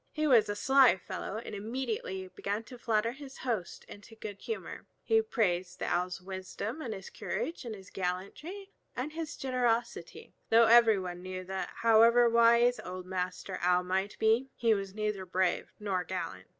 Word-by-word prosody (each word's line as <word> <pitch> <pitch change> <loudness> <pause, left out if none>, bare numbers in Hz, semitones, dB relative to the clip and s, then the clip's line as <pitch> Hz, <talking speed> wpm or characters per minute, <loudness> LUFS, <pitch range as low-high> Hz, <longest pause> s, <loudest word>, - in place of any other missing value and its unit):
He 310 -1 -1
was 240 -8 +5
a 205 - -1
sly 265 -1 +5
fellow, 195 +2 -6
and 225 - -7
immediately 215 -3 -4
began 205 +4 -3
to 250 +1 -12
flatter 230 0 +1
his 270 +1 -11
host 225 -9 -3
into 205 +2 -13
good 210 -2 -8
humor. 450 - -6 0.2
He 445 0 +4
praised 185 - -1
the - - -3
Owl's 180 +1 -1
wisdom 190 - -6
and 240 - -4
his 195 -2 -7
courage, 335 - -4
his 215 -6 -8
gallantry 200 - -5 0.2
and 265 +5 -3
his 320 -2 -5
generosity; 240 -7 -2 0.2
though 230 +1 +7
every 225 -2 +7
one 180 -2 -5
knew 185 0 -6
that 190 +1 -4
however 230 +1 +6
wise 235 +1 +5
old 185 0 -7
Master 185 0 -4
Owl 180 +1 +3
might 190 +2 -2
be, 225 +4 +2
he 230 -2 +3
was 195 -1 -4
neither 210 -2 -2
brave 185 0 0
nor 195 -4 -1
gallant. 175 - -5
215 Hz, 165 wpm, -31 LUFS, 185-240 Hz, 0.2 s, though